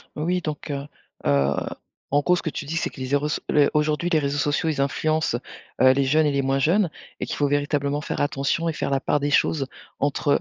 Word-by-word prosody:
Oui 175 +4 0
donc, 155 -1 -5
heu 140 0 -3 0.4
heu, 70 0 +3 0.6
en 145 - +4
gros, 180 +4 +3
ce - - -4
que 160 - -1
tu 145 - -5
dis, 155 +3 -4
c'est - - 0
que - - -13
les 130 - -3
0, 145 +2 +1 0.2
les 145 -1 +4
aujourd'hui, 150 +3 +1
les 160 - +4
réseaux 140 0 -1
sociaux, 150 +3 +1
ils 150 - -2
influencent, 155 -1 0 0.4
heu, 130 0 +8
les 140 +1 +2
jeunes 155 +4 +3
et - - +2
les 140 0 +1
moins 135 +1 +1
jeunes, 170 +5 +2 0.3
et - - -2
qu'il - - -4
faut 145 - +1
véritablement 145 0 0
faire - - -3
attention 145 +4 0
et 160 - -2
faire - - -2
la 135 - +2
part 145 - +1
des 145 +1 -1
choses 140 0 +2 0.3
entre, 145 +2 -1
145 Hz, 235 wpm, -24 LUFS, 140-155 Hz, 0.6 s, heu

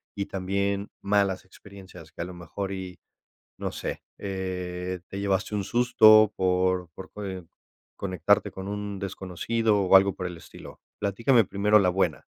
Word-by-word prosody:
y 100 - -2
también 100 +1 -2
malas 100 -2 +1
experiencias, 95 -4 -14
que - - -8
a - - -2
lo 90 - -8
mejor 95 +3 -5
y, 90 -3 -6 0.6
no - - -3
sé, - - -5 0.2
eh, 90 -2 -4
te 100 - -6
llevaste 100 +1 -1
un 100 - -1
susto 110 -2 +6
por 90 -2 +1
por, 95 -1 -10
coe 95 -4 -6 0.5
conectarte 100 +2 +1
con 95 +1 -7
un 100 -1 -4
desconocido 100 +3 -1
o 95 0 +4
algo 95 0 +6
por 90 - -5
el 90 -1 -7
estilo. - - -13 0.2
Platícame 115 +4 +3
primero 105 +3 +3
la 95 -3 +3
buena. 95 +2 0
95 Hz, 155 wpm, -26 LUFS, 90-100 Hz, 0.6 s, susto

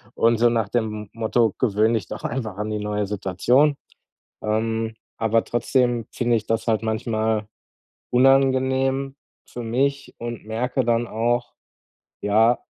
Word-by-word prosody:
und 115 0 +3
so 120 0 +5
nach 115 -4 0
dem 105 -3 -2
Motto: 115 -1 +1
„Gewöhn 110 -1 +2
dich 105 -6 -1
doch - - -7
einfach 110 -6 -3
an 105 +1 -3
die 105 - -2
neue 105 0 -1
Situation.“ 115 +9 +2 0.7
Ähm, 110 +1 -1 0.2
aber 115 0 +2
trotzdem, 120 -1 +1
finde 120 -1 +1
ich 110 - -5
das 115 0 0
halt 110 -1 +2
manchmal 110 -1 -1 0.6
unangenehm 135 +1 +3 0.3
für 120 - -7
mich 140 +5 -1
und 120 -1 -6
merke 125 +4 -1
dann 120 0 +1
auch, 120 +2 -1 0.7
ja, 110 +4 +4
115 Hz, 135 wpm, -23 LUFS, 110-125 Hz, 0.7 s, so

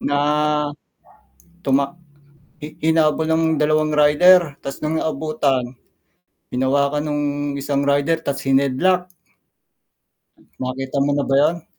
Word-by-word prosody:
Na 145 0 -1 1.5
tumak 140 +2 0 0.7
hi 150 - -9
hinabol 160 0 +2
ng 160 0 +1 0.2
2 155 0 +1
rider 150 +2 +4
ta's 135 - -7
no'ng 155 +1 -2
naabutan, 140 -5 -2 0.8
hinawakan 140 +3 0
no'ng 145 0 -1 0.4
isang 140 0 -1
rider 145 +3 +1
ta's 140 0 -3
hineadlock. 140 +7 +1 1.5
Nakita 130 +2 -4
mo 145 - 0
na 145 - 0
ba 135 - +1
'yon? 165 +3 +1
145 Hz, 105 wpm, -20 LUFS, 140-155 Hz, 1.5 s, rider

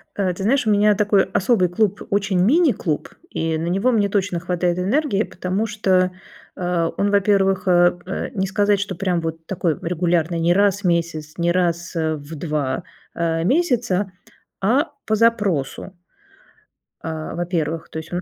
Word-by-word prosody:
А, 190 -3 0
ты 190 - -6
знаешь, 245 +1 +2
у - - +4
меня 210 +1 +4
такой 205 -1 +3
особый 185 -4 +1
клуб, 205 +2 0
очень 200 -2 +1
"мини" 285 - +4
клуб, 155 -8 -3 0.2
и 160 0 -1
на 165 +2 -3
него 195 +8 +2
мне 205 -3 +2
точно 190 -3 0
хватает 175 0 -1
энергии, 210 +3 +1
потому 185 +4 -3
что, 190 -4 +1 0.4
а, 175 -2 0
он, 200 +1 +1
во-первых, 195 -2 +2
э, 175 0 +4
э, 190 - -4
не 190 0 0
сказать 205 +1 +1
что 200 -1 -3
прям 180 -2 -1
вот 165 0 -5
такой 170 -4 -1
регулярный, 170 -1 0
не 170 +1 +3
раз 200 +1 +2
в - - -21
месяц, 165 -3 -1
не 170 0 +1
раз, 170 -1 -1
э, 160 -1 0
в 150 +2 -9
2, 145 -4 -2 0.3
а, 165 -1 0
месяца, 230 - +1 0.5
а 270 +10 +2 0.2
по 220 - +2
запросу. 205 -8 0 1.1
А, 160 0 -5
во-первых, 165 -2 -2
то 160 - -5
есть 160 +2 -10
он. 175 - -1
185 Hz, 170 wpm, -21 LUFS, 170-205 Hz, 1.1 s, у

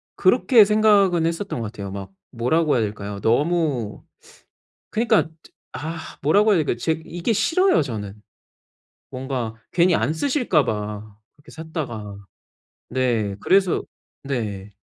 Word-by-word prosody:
그렇게 230 -6 +5
생각은 200 -5 +4
했었던 170 -2 -3
것 105 - -4
같아요. 100 -4 -7
막 95 -1 -7 0.2
뭐라고 145 +7 +1
해야 120 - +2
될까요? 100 -1 -5
너무 140 -2 0 0.9
그니까 220 -5 +2 0.4
아 160 +2 -5 0.2
뭐라고 205 +9 +4
해야 195 - +4
될까요? 150 -6 0
제 160 +7 0
이게 175 +6 -2
싫어요 330 - +3
저는. 105 -7 -5 1.0
뭔가 130 -4 -4 0.2
괜히 175 0 +4
안 135 +2 +1
쓰실까 240 - +1
봐. 105 -1 -5 0.2
그렇게 145 +1 -17
샀다가. 130 - -6 0.7
네 120 -6 0
그래서 190 -2 +2 0.4
네. 105 -7 -4
140 Hz, 260 characters per minute, -22 LUFS, 110-175 Hz, 1.0 s, 그렇게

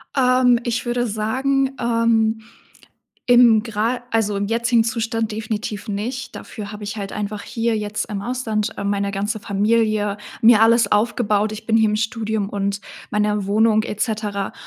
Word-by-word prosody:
Ähm, 255 -2 +4
ich 240 +1 -2
würde 240 0 0
sagen, 260 +6 0
ähm, 230 -2 +1 0.9
im 240 -3 +6
gera 230 +2 -1
also 210 -3 +1
im 200 - -1
jetzigen 230 +1 +2
Zustand 225 -1 -2
definitiv 215 0 -4
nicht. 245 +6 -4
Dafür 205 -3 -8
habe 210 0 -8
ich 205 +2 -5
halt 200 -2 -5
einfach 210 0 -4
hier 230 -1 -1
jetzt 210 0 -3
im 200 -2 -4
Ausland, 225 -3 -2
äh, 200 - -4
meine 200 0 0
ganze 205 +2 -3
Familie 210 0 +1 0.3
mir 225 -1 +7
alles 230 +1 +4
aufgebaut. 210 -1 +1
Ich 215 0 -8
bin 225 - +3
hier 220 -1 +4
im 210 - 0
Studium 220 -2 -2
und 200 0 -2 0.3
meiner 210 -1 0
Wohnung 215 +1 +3
et 210 -1 -6
cetera 210 -3 -2
220 Hz, 160 wpm, -21 LUFS, 210-230 Hz, 0.9 s, mir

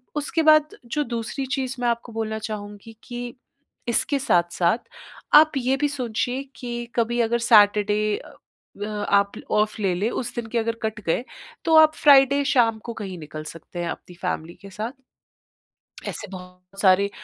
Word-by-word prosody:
उसके 300 +2 0
बाद 310 -1 +4
जो 295 +6 -1
दूसरी 235 +2 -4
चीज़ 265 -1 -3
मैं 245 - +1
आपको 235 0 -3
बोलना 220 -1 -3
चाहूँगी 210 +1 -8
कि 245 -1 -7 0.5
इसके 275 +4 +1
साथ-साथ 175 -3 +2 0.6
आप 310 0 +1
ये 260 +1 +1
भी 295 - +3
सोचिए 245 +3 -2
कि 240 -1 -5
कभी 240 0 0
अगर 235 +1 +1
सैटरडे 210 0 +4
अ, - - -14 0.4
व 205 0 -4
आप 200 0 +3 0.2
ऑफ़ 215 0 +1
ले 190 -3 +1
लें, 205 +6 0
उस 240 -1 -4
दिन 240 - -3
के 235 - -3
अगर 230 0 -1
कट 220 -1 -3
गए 165 +9 0 0.4
तो 320 - +4
आप 310 0 +6
फ्राइडे 280 -1 +6
शाम 225 -3 +3
को 235 - -5
कहीं 195 -5 -6
निकल 155 0 -8
सकते 165 +2 -10
हैं 170 -1 -2
अपनी 180 - -8
फ़ैमिली 170 -2 -3
के 200 - -11
साथ। 215 +5 -5 1.2
ऐसे - - -5
बहुत 180 +1 -11
सारे 200 +1 +4
225 Hz, 165 wpm, -23 LUFS, 200-245 Hz, 1.2 s, आप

